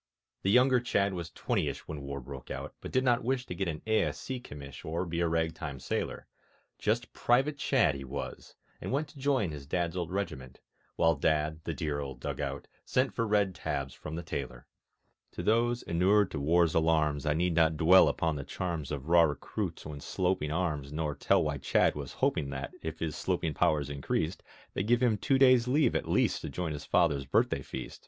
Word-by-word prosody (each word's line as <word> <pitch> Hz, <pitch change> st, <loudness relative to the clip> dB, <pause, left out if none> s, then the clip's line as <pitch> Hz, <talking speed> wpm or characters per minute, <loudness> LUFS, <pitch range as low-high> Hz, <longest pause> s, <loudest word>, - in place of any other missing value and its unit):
The 95 Hz, -, 0 dB
younger 125 Hz, +3 st, +5 dB
Chadd 100 Hz, -5 st, +1 dB
was 85 Hz, -2 st, -5 dB
twentyish -, -, -2 dB
When 75 Hz, -2 st, -6 dB
War 70 Hz, 0 st, -5 dB
broke 65 Hz, 0 st, -9 dB
out, -, -, -5 dB
but -, -, -7 dB
did 130 Hz, -, +2 dB
not 125 Hz, -2 st, +2 dB
wish 125 Hz, +1 st, 0 dB
To -, -, -5 dB
get 95 Hz, +1 st, -2 dB
an 80 Hz, -2 st, -4 dB
A.S.C. 110 Hz, +3 st, 0 dB
commish 70 Hz, -, -10 dB
Or 85 Hz, +3 st, -2 dB
be 85 Hz, -1 st, -3 dB
a 85 Hz, -, +2 dB
rag 80 Hz, 0 st, 0 dB
time 75 Hz, -5 st, -6 dB
sailor; -, -, -3 dB, 0.5 s
Just 115 Hz, +3 st, 0 dB
Private 135 Hz, +4 st, +2 dB
Chadd 130 Hz, -, +3 dB
he 70 Hz, -1 st, -6 dB
was, 70 Hz, +2 st, -7 dB, 0.3 s
and -, -, -4 dB
went 145 Hz, +3 st, -1 dB
To 145 Hz, -, -14 dB
join 130 Hz, -, +1 dB
his 70 Hz, -2 st, -8 dB
Dad's 85 Hz, +2 st, -1 dB
old 85 Hz, -3 st, -2 dB
regiment, 65 Hz, -10 st, -4 dB, 0.4 s
While 80 Hz, 0 st, +4 dB
Dad 80 Hz, 0 st, 0 dB
(the -, -, -3 dB
dear 75 Hz, -4 st, -2 dB
old 70 Hz, -3 st, -6 dB
dug -, -, -4 dB
out) -, -, -4 dB, 0.2 s
sent 130 Hz, -3 st, +1 dB
For 115 Hz, +3 st, -1 dB
red 105 Hz, -3 st, +2 dB
tabs 70 Hz, -5 st, -3 dB
from 75 Hz, -, -7 dB
the 85 Hz, -, -4 dB
tailor. 65 Hz, -6 st, -5 dB, 0.7 s
To -, -, -5 dB
those 120 Hz, +2 st, +2 dB
inured 95 Hz, +4 st, +3 dB
to -, -, -3 dB
war's 85 Hz, +3 st, +3 dB
alarms 80 Hz, -2 st, +2 dB
I 75 Hz, -, +2 dB
need 90 Hz, +1 st, +1 dB
not 80 Hz, -1 st, +3 dB
dwell 90 Hz, +5 st, +7 dB
upon 80 Hz, -3 st, 0 dB
the 70 Hz, -, -4 dB
charms 85 Hz, -3 st, -4 dB
Of 70 Hz, -1 st, -4 dB
raw 85 Hz, +1 st, +6 dB
recruits 75 Hz, -3 st, -2 dB
when 75 Hz, -1 st, -7 dB
sloping 90 Hz, -4 st, -1 dB
arms, 75 Hz, -5 st, -1 dB
Nor 75 Hz, -1 st, -2 dB
tell -, -, +2 dB
why -, -, -2 dB
Chadd -, -, +3 dB
was 70 Hz, -3 st, -6 dB
hoping 70 Hz, -2 st, 0 dB
That, 70 Hz, 0 st, -5 dB
if 80 Hz, 0 st, -5 dB
his 80 Hz, -3 st, -3 dB
sloping 80 Hz, -, -1 dB
powers 75 Hz, -1 st, +2 dB
increased, 75 Hz, +4 st, -2 dB, 0.3 s
They'd 95 Hz, -, -2 dB
give 120 Hz, +1 st, +3 dB
him 110 Hz, -4 st, +3 dB
two 135 Hz, -, +2 dB
days' 130 Hz, -3 st, +6 dB
leave 145 Hz, +4 st, +3 dB
at -, -, -1 dB
least -, -, +2 dB
To -, -, -5 dB
join 90 Hz, -3 st, -3 dB
his 70 Hz, -2 st, -6 dB
Father's 75 Hz, -7 st, +2 dB
birthday -, -, +2 dB
feast... -, -, -7 dB
85 Hz, 205 wpm, -30 LUFS, 75-105 Hz, 0.7 s, dwell